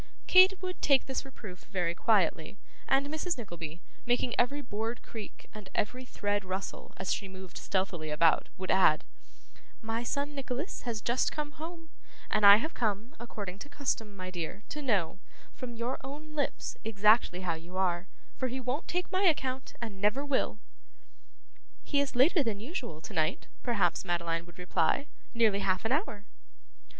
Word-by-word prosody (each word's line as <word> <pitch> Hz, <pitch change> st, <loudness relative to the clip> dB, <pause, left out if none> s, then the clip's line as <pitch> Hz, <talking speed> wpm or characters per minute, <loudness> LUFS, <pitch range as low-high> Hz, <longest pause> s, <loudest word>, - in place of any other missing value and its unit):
Kate 370 Hz, +1 st, +7 dB
would 365 Hz, 0 st, -4 dB
take 275 Hz, -2 st, +4 dB
this 265 Hz, -, -2 dB
reproof 215 Hz, -9 st, -10 dB
very 180 Hz, -4 st, 0 dB
quietly, 185 Hz, -3 st, +2 dB, 0.3 s
and 270 Hz, +1 st, +3 dB
Mrs. 315 Hz, +3 st, -2 dB
Nickleby, 175 Hz, -7 st, -7 dB, 0.2 s
making 245 Hz, 0 st, +1 dB
every 280 Hz, +4 st, +1 dB
board 225 Hz, +1 st, -3 dB
creak 220 Hz, -3 st, -9 dB
and 210 Hz, -3 st, -9 dB
every 255 Hz, +5 st, -1 dB
thread 205 Hz, -4 st, -1 dB
rustle 190 Hz, +1 st, -5 dB
as -, -, 0 dB
she 200 Hz, -, -4 dB
moved 190 Hz, -1 st, -10 dB
stealthily 185 Hz, -5 st, -1 dB
about, 155 Hz, +1 st, +3 dB
would 185 Hz, 0 st, -2 dB
add: 185 Hz, -5 st, +5 dB, 0.8 s
'My 225 Hz, 0 st, -2 dB
son 285 Hz, +4 st, -2 dB
Nicholas 275 Hz, +3 st, -4 dB
has 220 Hz, -2 st, -3 dB
just 240 Hz, +2 st, +2 dB
come 300 Hz, -1 st, -3 dB
home, 325 Hz, +1 st, -8 dB, 0.4 s
and 210 Hz, -1 st, +6 dB
I 200 Hz, -, +12 dB
have 275 Hz, +10 st, -1 dB
come, 220 Hz, +5 st, -1 dB
according 205 Hz, -5 st, -6 dB
to 285 Hz, -, -8 dB
custom, 255 Hz, -7 st, -2 dB
my 185 Hz, 0 st, -5 dB
dear, 180 Hz, +3 st, -5 dB
to 300 Hz, -, -5 dB
know, 200 Hz, -, +1 dB, 0.3 s
from 245 Hz, -2 st, -7 dB
your 235 Hz, +3 st, -2 dB
own 295 Hz, +3 st, -8 dB
lips, 290 Hz, -2 st, -2 dB
exactly 215 Hz, -3 st, +4 dB
how 180 Hz, -3 st, 0 dB
you 170 Hz, +3 st, -8 dB
are; 180 Hz, -1 st, +1 dB, 0.3 s
for 260 Hz, -, 0 dB
he 255 Hz, +1 st, -3 dB
won't 255 Hz, +4 st, -2 dB
take 360 Hz, +1 st, -2 dB
my 375 Hz, +1 st, +2 dB
account, 265 Hz, -5 st, +1 dB
and 215 Hz, -5 st, -6 dB
never 220 Hz, +8 st, +2 dB
will.' 275 Hz, -6 st, +1 dB, 1.3 s
'He 285 Hz, -, +1 dB
is 280 Hz, -2 st, -2 dB
later 300 Hz, +7 st, +5 dB
than 220 Hz, -5 st, -1 dB
usual 235 Hz, -, -5 dB
to -, -, -9 dB
night,' 155 Hz, +2 st, 0 dB
perhaps 235 Hz, -5 st, +1 dB
Madeline 170 Hz, -2 st, -1 dB
would 175 Hz, +1 st, -15 dB
reply. 180 Hz, +9 st, +1 dB, 0.3 s
'Nearly 220 Hz, -4 st, +4 dB
half 185 Hz, 0 st, 0 dB
an 225 Hz, -, +1 dB
hour. 260 Hz, -, 0 dB
225 Hz, 165 wpm, -31 LUFS, 190-275 Hz, 1.3 s, I